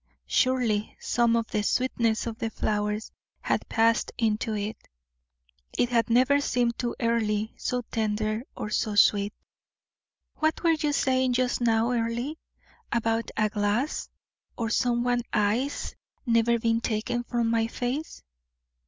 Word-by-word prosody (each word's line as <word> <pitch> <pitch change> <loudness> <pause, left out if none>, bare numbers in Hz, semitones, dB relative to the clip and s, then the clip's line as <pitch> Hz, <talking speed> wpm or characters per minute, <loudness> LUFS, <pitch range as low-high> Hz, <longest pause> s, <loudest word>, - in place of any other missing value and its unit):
Surely 245 -5 +1
some 235 -1 +2
of 230 -1 +1
the 210 - +1
sweetness 230 0 +1
of 230 -1 -5
the 225 - -1
flowers 210 0 -2 0.3
had - - -1
passed 230 0 +2
into 220 -1 0
it; 210 +1 -3 1.0
it 240 - +2
had 235 -2 +2
never 260 +5 +4
seemed 240 -4 +1
to 240 -1 -2
Earle 220 -2 +1
so 250 0 -2
tender 215 0 -1 0.2
or 210 - -4
so 215 -1 0
sweet. 205 0 +4 1.1
"What 315 +2 0
were 335 - +5
you 300 -2 0
saying 260 -2 +2
just 250 0 0
now, 230 0 +2
Earle, 235 +4 -1 0.6
about 230 0 0
a 215 -1 +3
glass, 210 +7 -1 0.5
or 230 -1 -2
some 240 -1 +1
one's 245 0 +1
eyes 220 +7 0 0.3
never 235 0 +3
being 230 0 +1
taken 240 +2 -1
from 235 -1 0
my 225 -1 +2
face? 250 +7 -4
230 Hz, 135 wpm, -27 LUFS, 220-245 Hz, 1.1 s, were